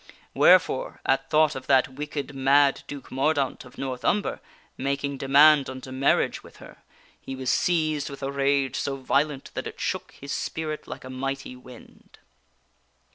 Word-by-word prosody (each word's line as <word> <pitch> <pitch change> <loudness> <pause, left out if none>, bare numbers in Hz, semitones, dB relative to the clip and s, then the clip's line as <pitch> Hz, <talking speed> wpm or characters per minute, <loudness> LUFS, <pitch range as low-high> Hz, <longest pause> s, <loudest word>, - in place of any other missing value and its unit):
Wherefore, - - +4
at 135 0 +1
thought 155 -1 +4
of 130 -2 -8
that 130 -1 +4
wicked, 145 +1 -5
mad 140 +1 +3
Duke 145 -1 -9
Mordaunt 135 0 0
of 125 - -16
North 130 -2 -4
Umber 205 +1 0 0.3
making 140 0 -2
demand 140 +1 +5
unto 130 0 -8
marriage 130 +1 +1
with - - -16
her, - - -13 0.4
he 135 - -6
was 130 -1 -1
seized 155 -4 +1
with 140 0 -9
a 135 - -2
rage 140 -1 +1
so 140 - -2
violent 140 +1 -1
that - - -4
it - - -9
shook - - -3
his 140 0 -9
spirit 155 -1 -4
like - - -8
a 130 - -9
mighty 135 0 -4
wind. 125 -1 -16
140 Hz, 160 wpm, -25 LUFS, 130-145 Hz, 0.4 s, demand